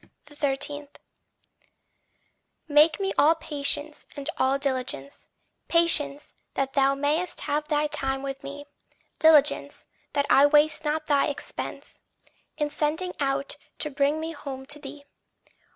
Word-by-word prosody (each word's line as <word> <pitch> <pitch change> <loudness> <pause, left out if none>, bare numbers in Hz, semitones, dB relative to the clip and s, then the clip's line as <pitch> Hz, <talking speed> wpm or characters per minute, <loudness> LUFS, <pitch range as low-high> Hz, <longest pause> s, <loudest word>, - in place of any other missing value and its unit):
13. 290 0 -2 1.8
Make 300 +2 +5
me 390 0 -1
all 315 +3 +6
patience 295 -1 -2
and 285 +2 -3
all 265 +1 +3
diligence; 260 - -3 0.4
Patience, 295 -4 +2 0.2
that 270 0 -1
thou 275 -1 +3
mayst 300 +6 -1
have 300 +1 -1
thy 300 -1 +1
time 270 -3 -2
with 275 0 -5
me; 285 +1 -8 0.5
Diligence, 310 -3 +4 0.3
that 285 - +1
I 280 +1 +6
waste 300 +1 +3
not 305 0 -1
thy 285 -3 +2
expense 290 - -6 0.6
In 295 -2 -1
sending 320 +5 -1
out 275 0 -1 0.2
to 300 - -1
bring 280 +2 +1
me 320 +1 -4
home 265 -4 -7
to 290 +2 -2
thee. 285 -1 -10
290 Hz, 125 wpm, -26 LUFS, 275-305 Hz, 1.8 s, all